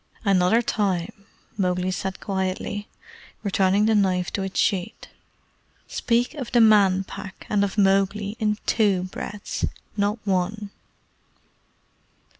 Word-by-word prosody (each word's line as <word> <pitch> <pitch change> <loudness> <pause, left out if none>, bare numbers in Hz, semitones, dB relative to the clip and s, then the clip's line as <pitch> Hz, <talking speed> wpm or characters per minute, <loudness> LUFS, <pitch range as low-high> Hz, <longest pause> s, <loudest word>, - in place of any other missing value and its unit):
"Another 195 +4 +3
time," 200 -2 -2 0.3
Mowgli 180 0 0
said 190 0 -4
quietly, 190 +1 -3 0.6
returning 195 0 +2
the 220 - +3
knife 185 -3 +1
to 200 - -1
its 190 0 -3
sheath, 200 +1 0 0.8
"speak 240 +2 0
of 270 -6 -6
the 240 - +4
Man 200 -4 +5
Pack 190 0 -9
and 205 -1 +3
of 200 +1 -2
Mowgli 195 +1 +2
in 210 -2 +1
TWO 200 -5 +2
breaths 195 +2 -6 0.3
not 205 +1 0
one." 200 +2 -1
200 Hz, 115 wpm, -24 LUFS, 190-210 Hz, 0.8 s, Man